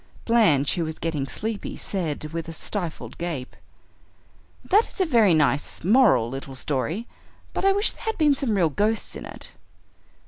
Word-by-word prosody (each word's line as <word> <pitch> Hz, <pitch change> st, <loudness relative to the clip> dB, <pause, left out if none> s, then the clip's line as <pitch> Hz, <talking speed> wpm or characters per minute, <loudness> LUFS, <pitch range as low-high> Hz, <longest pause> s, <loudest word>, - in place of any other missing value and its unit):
Blanche, 185 Hz, -, +4 dB
who 175 Hz, -, -1 dB
was 160 Hz, 0 st, -5 dB
getting 155 Hz, -5 st, -2 dB
sleepy, 215 Hz, +7 st, -4 dB
said, 155 Hz, -5 st, -3 dB
with 165 Hz, -1 st, -4 dB
a -, -, -6 dB
stifled 175 Hz, 0 st, -5 dB
gape, 165 Hz, -7 st, -4 dB, 1.1 s
"That 420 Hz, +4 st, +4 dB
is -, -, -11 dB
a 375 Hz, -, +3 dB
very 225 Hz, -, +4 dB
nice, 145 Hz, -1 st, +1 dB
moral 215 Hz, -, +5 dB
little 135 Hz, +2 st, -7 dB
story, 145 Hz, -, -2 dB, 0.5 s
but -, -, -2 dB
I 390 Hz, -, +6 dB
wish 405 Hz, +2 st, +4 dB
there -, -, -12 dB
had 445 Hz, -, -1 dB
been 300 Hz, -3 st, +4 dB
some 265 Hz, -6 st, -1 dB
real 175 Hz, -5 st, +3 dB
ghosts 210 Hz, +7 st, 0 dB
in -, -, -7 dB
it." -, -, -6 dB
175 Hz, 170 wpm, -24 LUFS, 150-230 Hz, 1.1 s, I